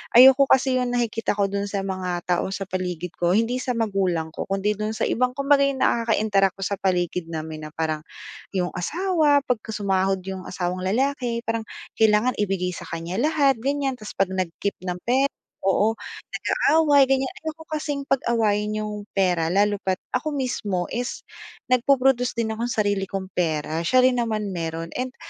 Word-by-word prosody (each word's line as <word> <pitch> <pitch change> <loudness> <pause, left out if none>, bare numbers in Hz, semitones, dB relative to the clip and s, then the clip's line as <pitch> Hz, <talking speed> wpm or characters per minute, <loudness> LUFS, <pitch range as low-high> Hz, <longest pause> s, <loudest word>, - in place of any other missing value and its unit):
ayoko 265 +3 +9
kasi 265 0 +2
yung 250 -1 -1
nakikita 230 -2 0
ko 200 -1 0
do'n 200 0 -2
sa 200 -1 -2
mga 185 -2 -3
tao 175 - +2
sa 195 - -4
paligid 180 -2 -3
ko 175 0 +2
hindi 230 +4 +2
sa 255 -1 -2
magulang 195 -8 0
ko 160 - -5
kundi 195 +1 -1
do'n 215 +1 -2
sa - - -7
ibang 250 +1 +1
kumbaga 280 +1 +3
nakaka-interact 220 -6 +2
ko 195 - -3
sa 200 0 -1
paligid 180 -2 0
namin 155 -1 -5
na 155 - -9
parang 155 -1 -2 0.5
yung 180 -2 0
asawa 310 - +2
pagkasumahod 195 -5 0
yung 190 -1 -6
asawang 180 0 -3
lalaki, 245 +2 0
parang 230 -1 -1 0.3
kailangan 220 +3 +3
ibigay 190 -3 0
sa 170 - -8
kanya 165 +2 -4
lahat 280 0 +3
gan'yan 275 -1 -1
tapos 215 - -9
pag 195 -1 +2
nag-keep 185 +1 -2
ng 180 0 -3
pera 260 +3 +3 0.4
oo, 205 +3 +2 0.3
nag-aaway 290 -4 +3
gan'yan. 265 0 +1
Ayoko 320 +1 -6
kasing 295 -2 -2
pag-awayin 215 -4 +1
yung 210 -1 -6
pera 180 -4 +2
lalo 205 0 +2
pa't 190 -1 0 0.2
ako 295 +4 -1
mismo 210 -9 -1
is 245 +1 -3 0.5
nagpo-produce 255 -1 +3
din 230 -1 -1
akong 230 +2 -2
sarili 205 -4 0
kong 190 -1 -5
pera 160 -2 -1
siya 255 +9 +4
rin 250 -1 +4
naman 215 -3 -1
mayro'n 165 -1 -4
and 255 +1 -3
210 Hz, 165 wpm, -24 LUFS, 185-255 Hz, 0.5 s, ayoko